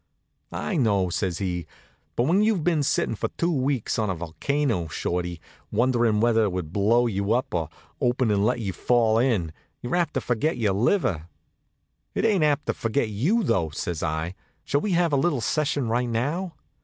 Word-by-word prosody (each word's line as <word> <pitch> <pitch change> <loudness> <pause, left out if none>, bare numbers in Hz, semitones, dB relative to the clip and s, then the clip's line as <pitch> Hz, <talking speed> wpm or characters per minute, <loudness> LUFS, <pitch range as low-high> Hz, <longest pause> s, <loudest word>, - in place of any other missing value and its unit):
"I 195 - -2
know," 100 - +2
says 90 -1 -1
he; 90 -4 -3 0.5
"but 120 - +2
when 175 +9 +3
you've 210 -6 +2
been 165 -3 +2
sitting 140 - +1
for 110 - -2
two 170 +1 +1
weeks 135 -6 0
on 110 -2 0
a 95 - -1
volcano, 85 - -1
Shorty, 85 +2 -3 0.3
wondering 120 -1 +2
whether 115 0 +3
it 100 - -1
would 90 -3 -4
blow 115 +5 +3
you 100 -1 0
up, 125 +1 -1
or 80 -4 -1 0.3
open 125 -2 +2
and 100 -1 +2
let 120 +3 +1
you 100 -5 -3
fall 115 -1 +2
in, 105 -11 +1 0.3
you're 120 - -3
apt 175 -3 0
to - - +1
forget 125 +7 0
your 105 -5 +1
liver." 100 - +1 0.9
"It - - +1
ain't 200 -7 +3
apt 150 -1 +2
to - - 0
forget 115 +1 -1
you, 160 - +1
though," 85 - +1
says 80 +2 -4
I. 80 +2 -2 0.3
"Shall 145 - 0
we 205 - -1
have 170 -3 +2
a - - +4
little 140 0 +1
session 145 0 0
right 120 +2 0
now?" 150 +11 -2
115 Hz, 190 wpm, -25 LUFS, 95-145 Hz, 0.9 s, a